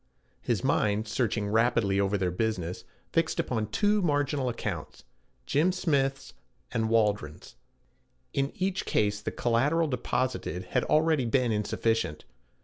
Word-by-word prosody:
His -, -, -1 dB
mind, 105 Hz, +1 st, +1 dB
searching 110 Hz, -2 st, 0 dB
rapidly 110 Hz, -3 st, +2 dB
over 100 Hz, +1 st, +1 dB
their 90 Hz, -2 st, 0 dB
business, 90 Hz, -3 st, -2 dB, 0.3 s
fixed 165 Hz, -1 st, +1 dB
upon 110 Hz, -4 st, -1 dB
two 205 Hz, -, +2 dB
marginal 145 Hz, -5 st, +1 dB
accounts 105 Hz, -9 st, -5 dB, 0.4 s
Jim 160 Hz, +6 st, +2 dB
Smith's 135 Hz, -6 st, 0 dB, 0.4 s
and 110 Hz, -2 st, 0 dB
Waldron's. 105 Hz, -9 st, 0 dB, 0.8 s
In 135 Hz, 0 st, 0 dB
each 190 Hz, 0 st, -2 dB
case 105 Hz, 0 st, +1 dB
the -, -, -2 dB
collateral 145 Hz, +8 st, +1 dB
deposited 125 Hz, -, -2 dB
had -, -, +1 dB
already 155 Hz, -3 st, +3 dB
been 125 Hz, 0 st, +2 dB
insufficient. 105 Hz, -5 st, -1 dB
115 Hz, 125 wpm, -28 LUFS, 105-140 Hz, 0.8 s, already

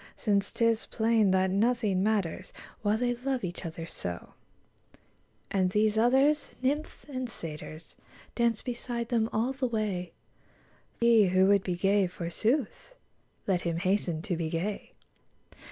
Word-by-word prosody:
Since 200 Hz, -3 st, +1 dB
'tis 230 Hz, -1 st, +1 dB
plain 220 Hz, -2 st, +2 dB
that 185 Hz, 0 st, +2 dB
nothing 210 Hz, -2 st, +1 dB
matters 200 Hz, -5 st, -1 dB, 0.3 s
While 210 Hz, +1 st, +2 dB
they 245 Hz, +1 st, +1 dB
love 260 Hz, -1 st, -2 dB
each 180 Hz, 0 st, -5 dB
other 165 Hz, 0 st, -6 dB
so; 90 Hz, -, -7 dB, 1.2 s
And 190 Hz, -2 st, +2 dB
these 210 Hz, +2 st, +2 dB
others, 265 Hz, +6 st, +3 dB
nymphs 285 Hz, +4 st, -2 dB
and 255 Hz, -3 st, -4 dB
satyrs, 155 Hz, -4 st, -8 dB, 0.4 s
Dance 235 Hz, -2 st, +1 dB
beside 240 Hz, -1 st, -4 dB
them 230 Hz, -2 st, +1 dB
all 235 Hz, +5 st, 0 dB
the 265 Hz, -1 st, -1 dB
way: 205 Hz, -7 st, -2 dB, 0.9 s
He 230 Hz, -3 st, +5 dB
who 185 Hz, +1 st, +4 dB
would 200 Hz, 0 st, +4 dB
be 180 Hz, -2 st, -2 dB
gay, 195 Hz, +2 st, +2 dB
forsooth, 215 Hz, -, -2 dB, 0.5 s
Let 185 Hz, -3 st, +1 dB
him 170 Hz, -1 st, -2 dB
hasten 180 Hz, -3 st, 0 dB
to 195 Hz, -5 st, -1 dB
be 165 Hz, -1 st, -2 dB
gay. 180 Hz, +6 st, -3 dB
210 Hz, 135 wpm, -29 LUFS, 185-235 Hz, 1.2 s, He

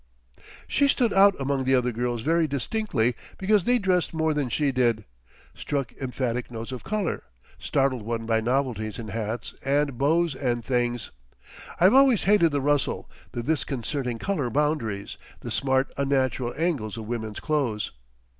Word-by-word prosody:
She 280 Hz, -, +3 dB
stood 245 Hz, -5 st, +2 dB
out 195 Hz, -2 st, +5 dB
among 135 Hz, 0 st, 0 dB
the 130 Hz, +1 st, +3 dB
other 125 Hz, -1 st, +1 dB
girls 120 Hz, 0 st, -2 dB
very 165 Hz, +1 st, +2 dB
distinctly 140 Hz, -, 0 dB, 0.2 s
because 200 Hz, -1 st, +2 dB
they 245 Hz, 0 st, +4 dB
dressed 185 Hz, -6 st, 0 dB
more 160 Hz, -1 st, +1 dB
than 145 Hz, -4 st, -1 dB
she 145 Hz, +2 st, +1 dB
did, 120 Hz, -5 st, +1 dB, 0.5 s
struck 140 Hz, -5 st, -3 dB
emphatic 125 Hz, -3 st, -3 dB
notes 115 Hz, 0 st, -6 dB
of 130 Hz, -, -6 dB
colour, 210 Hz, -4 st, -2 dB, 0.4 s
startled 135 Hz, -3 st, +1 dB
one 115 Hz, +1 st, -3 dB
by 110 Hz, 0 st, +2 dB
novelties 120 Hz, -3 st, -1 dB
in 115 Hz, -3 st, -6 dB
hats 110 Hz, +2 st, -4 dB
and 140 Hz, -2 st, +1 dB
bows 160 Hz, +3 st, +2 dB
and 120 Hz, -3 st, -2 dB
things. 120 Hz, -3 st, -1 dB, 0.7 s
I've 185 Hz, +5 st, +6 dB
always 265 Hz, -5 st, +6 dB
hated 190 Hz, -5 st, +4 dB
the 145 Hz, -1 st, 0 dB
rustle, 145 Hz, 0 st, 0 dB, 0.2 s
the 120 Hz, -, -3 dB
disconcerting 135 Hz, -3 st, -2 dB
colour 150 Hz, -5 st, -1 dB
boundaries, 120 Hz, -7 st, -1 dB, 0.2 s
the 120 Hz, -, -6 dB
smart 130 Hz, +3 st, +1 dB
unnatural 130 Hz, -3 st, 0 dB
angles 145 Hz, -, -1 dB
of 110 Hz, -, -6 dB
women's 110 Hz, -2 st, -4 dB
clothes. 135 Hz, -9 st, -1 dB
135 Hz, 155 wpm, -26 LUFS, 120-155 Hz, 0.7 s, I've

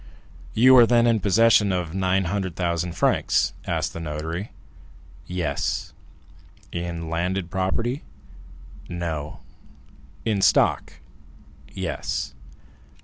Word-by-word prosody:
"You 130 Hz, +4 st, +7 dB
are 120 Hz, -2 st, +8 dB
then 120 Hz, 0 st, +4 dB
in 115 Hz, -2 st, +3 dB
possession 105 Hz, 0 st, +4 dB
of 90 Hz, -3 st, -2 dB
900,000 90 Hz, -2 st, -1 dB
francs?" -, -, +1 dB
asked -, -, -1 dB
the -, -, -6 dB
notary. 80 Hz, +5 st, -4 dB, 0.8 s
"Yes." 90 Hz, -1 st, -2 dB, 0.8 s
"In 85 Hz, -1 st, -4 dB
landed 85 Hz, +2 st, -2 dB
property?" 115 Hz, +8 st, -1 dB, 0.9 s
"No." 80 Hz, -4 st, -4 dB, 0.8 s
"In 105 Hz, -3 st, +1 dB
stock?" -, -, +3 dB, 0.8 s
"Yes." 65 Hz, 0 st, -3 dB
90 Hz, 85 wpm, -24 LUFS, 85-105 Hz, 0.9 s, are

